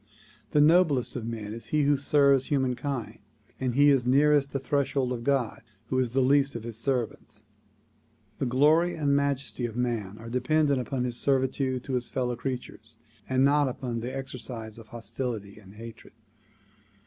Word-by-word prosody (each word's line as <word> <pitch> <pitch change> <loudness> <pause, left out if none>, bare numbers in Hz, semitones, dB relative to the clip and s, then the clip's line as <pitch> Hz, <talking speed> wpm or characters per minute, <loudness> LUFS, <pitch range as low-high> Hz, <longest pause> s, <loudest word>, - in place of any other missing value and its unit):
The 150 - +3
noblest 155 -4 +3
of 115 -3 -4
men 110 -2 -5
is 115 - -7
he 150 -1 +1
who 145 +1 +4
serves 140 -1 +3
humankind, 130 -2 -2 0.4
and 125 -2 -1
he 145 +1 +6
is 130 -3 +2
nearest 140 +1 +4
the - - -1
threshold 135 -1 0
of 120 -1 -5
God 135 -4 0 0.3
who 130 - +1
is 125 -2 +1
the 130 +3 +1
least 140 0 +3
of 115 - -5
his 115 -1 -6
servants. 120 0 -3 1.0
The 130 - 0
glory 155 +7 +3
and 145 -3 +1
majesty 140 -3 -1
of 115 0 -9
man 115 -5 -2
are 115 - -10
dependent 140 +2 +2
upon 125 0 -3
his 120 -1 -2
servitude 130 -1 0
to 135 - -5
his 125 -1 -1
fellow 125 -2 -1
creatures 125 +1 -6 0.3
and 130 +1 +3
not 145 0 +3
upon 125 -2 -4
the 120 +3 -4
exercise 125 -4 -6
of 110 - -13
hostility 115 -3 -5
and 100 -1 -16
hatred. 115 +1 -11
130 Hz, 170 wpm, -27 LUFS, 120-140 Hz, 1.0 s, he